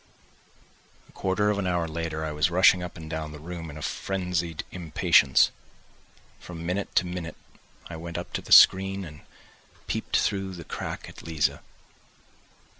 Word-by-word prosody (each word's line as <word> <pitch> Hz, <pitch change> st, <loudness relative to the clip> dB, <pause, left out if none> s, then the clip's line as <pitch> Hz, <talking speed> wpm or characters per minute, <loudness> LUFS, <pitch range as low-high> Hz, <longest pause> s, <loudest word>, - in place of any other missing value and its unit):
X -, -, -30 dB
A -, -, -18 dB
quarter 100 Hz, +2 st, 0 dB
of 100 Hz, -, -1 dB
an 95 Hz, -, -1 dB
hour 90 Hz, -2 st, 0 dB
later 80 Hz, -1 st, -4 dB
I 80 Hz, -, -3 dB
was 75 Hz, +3 st, +1 dB
rushing 90 Hz, +1 st, +5 dB
up 90 Hz, -1 st, -7 dB
and 80 Hz, -1 st, -9 dB
down 80 Hz, -1 st, -5 dB
the 75 Hz, -, -9 dB
room 85 Hz, +1 st, -7 dB
in 75 Hz, +1 st, -9 dB
frenzied 90 Hz, -4 st, -2 dB
impatience, 75 Hz, -6 st, +3 dB, 0.9 s
from 85 Hz, -2 st, -9 dB
minute 90 Hz, +3 st, -3 dB
to 90 Hz, -, +4 dB
minute 90 Hz, -3 st, -5 dB, 0.5 s
I 85 Hz, -, -7 dB
went 85 Hz, +1 st, -6 dB
up 85 Hz, -, -7 dB
to -, -, -2 dB
the -, -, -13 dB
screen 95 Hz, +1 st, +6 dB
and 75 Hz, -2 st, -11 dB, 0.6 s
peeped -, -, -1 dB
through 95 Hz, -1 st, -1 dB
the 85 Hz, -, -8 dB
crack -, -, -6 dB
at -, -, -12 dB
Liza. 80 Hz, -2 st, -1 dB
85 Hz, 165 wpm, -26 LUFS, 80-90 Hz, 0.9 s, screen